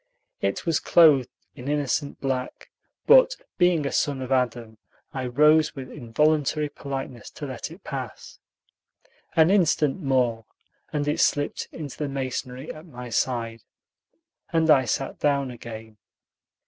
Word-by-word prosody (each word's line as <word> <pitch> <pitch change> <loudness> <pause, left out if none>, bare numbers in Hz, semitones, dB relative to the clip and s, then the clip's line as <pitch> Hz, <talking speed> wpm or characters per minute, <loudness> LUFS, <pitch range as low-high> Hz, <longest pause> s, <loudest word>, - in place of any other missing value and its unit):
It - - -1
was 165 -3 +2
clothed 150 -7 +5 0.2
in 130 -1 -9
innocent 145 -1 -1
black; 130 -2 -3 0.3
but, - - +7 0.2
being 175 -4 +3
a 140 - -1
son 140 -2 0
of 130 - -7
Adam, 120 -4 -1 0.3
I 130 -2 -3
rose 150 +5 +4
with 130 -2 -8
involuntary 150 +3 +1
politeness 135 -5 -6
to - - -8
let - - -6
it - - -13
pass. - - -7 1.0
An 160 +2 +5
instant 165 -4 +2
more, 125 -5 +1 0.5
and 145 -1 -1
it 150 - 0
slipped 145 0 +1
into 150 -5 -8
the 150 -2 -2
masonry 130 0 -4
at 155 +3 -12
my 125 -4 -9
side, 115 -1 -1 0.9
and 160 -1 +3
I 130 -3 +5
sat 135 +4 -2
down 140 -3 +1
again. 110 -2 -10
135 Hz, 135 wpm, -25 LUFS, 125-150 Hz, 1.0 s, but